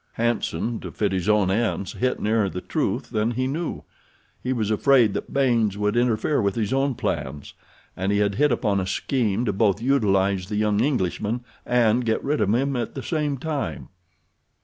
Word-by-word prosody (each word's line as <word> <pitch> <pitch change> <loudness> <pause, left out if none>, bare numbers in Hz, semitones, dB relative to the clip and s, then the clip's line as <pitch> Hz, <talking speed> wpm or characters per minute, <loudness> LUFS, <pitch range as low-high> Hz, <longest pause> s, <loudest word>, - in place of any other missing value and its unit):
Hanson, 120 0 -1
to - - -7
fit 105 - -1
his 95 +1 -1
own 105 -3 +3
ends, 105 -3 -1
hit 125 +1 -1
nearer 110 -2 +1
the 90 - -5
truth - - -2
than 110 +1 +1
he 125 +2 -1
knew. 155 +6 -3 0.6
He 125 - -2
was 110 -4 0
afraid 120 -1 +4
that - - -5
Baynes 115 -7 +2
would 105 +1 0
interfere 120 +3 +1
with 100 -2 0
his 110 0 -1
own 135 -1 +1
plans, 70 -8 -4 0.4
and 95 +2 -1
he 100 - +2
had 100 -1 +2
hit 145 +6 +2
upon 105 -4 +1
a 95 - -2
scheme 115 +1 0
to 105 - 0
both 100 -1 +2
utilize 100 -7 +1
the 105 - -2
young 105 -1 +1
Englishman 120 -3 -1 0.3
and 120 0 +3
get 110 -1 0
rid 145 +2 0
of 100 - +2
him 135 +4 +1
at 120 -3 -3
the 135 - -5
same 150 -4 -1
time. 150 0 -4
110 Hz, 190 wpm, -24 LUFS, 100-130 Hz, 0.6 s, afraid